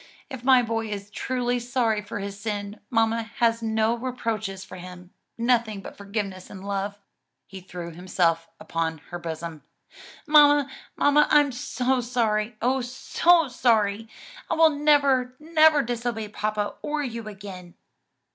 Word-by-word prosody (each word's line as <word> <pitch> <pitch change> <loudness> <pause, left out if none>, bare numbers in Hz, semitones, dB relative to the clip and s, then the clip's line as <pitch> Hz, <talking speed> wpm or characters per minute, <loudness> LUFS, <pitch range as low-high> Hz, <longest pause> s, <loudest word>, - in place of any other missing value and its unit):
If 260 -2 -7
my 255 -1 +6
boy 225 -1 -2
is 205 -1 -6
truly 245 +1 -1
sorry 240 -3 0
for 205 - -6
his 200 0 -6
sin, 205 0 -4
mamma 225 0 +2
has 230 -1 +2
no 220 0 +1
reproaches 225 -6 -4
for 185 - -10
him: 180 0 -11 0.3
nothing 230 -3 +1
but - - -10
forgiveness 200 -2 -5
and 190 0 -10
love." 200 0 -3 0.5
He 190 -1 -10
threw 175 -2 -7
himself 165 -1 0
upon 165 -1 -2
her 175 - -4
bosom, 165 -2 -6 0.6
"Mamma, 290 -2 +6 0.2
mamma, 295 +1 +4
I 295 - +7
am 285 -1 -1
sorry, 240 -3 0
oh, 260 +2 +2
so 300 +6 +2
sorry! 225 -3 +1 0.4
I - - +1
will 325 -1 +6
never, 285 -4 +3
never 310 -1 +4
disobey 235 -2 -3
papa 210 0 -2
or 295 0 -2
you 230 -4 -5
again." 190 -4 -9
225 Hz, 140 wpm, -25 LUFS, 200-255 Hz, 0.6 s, I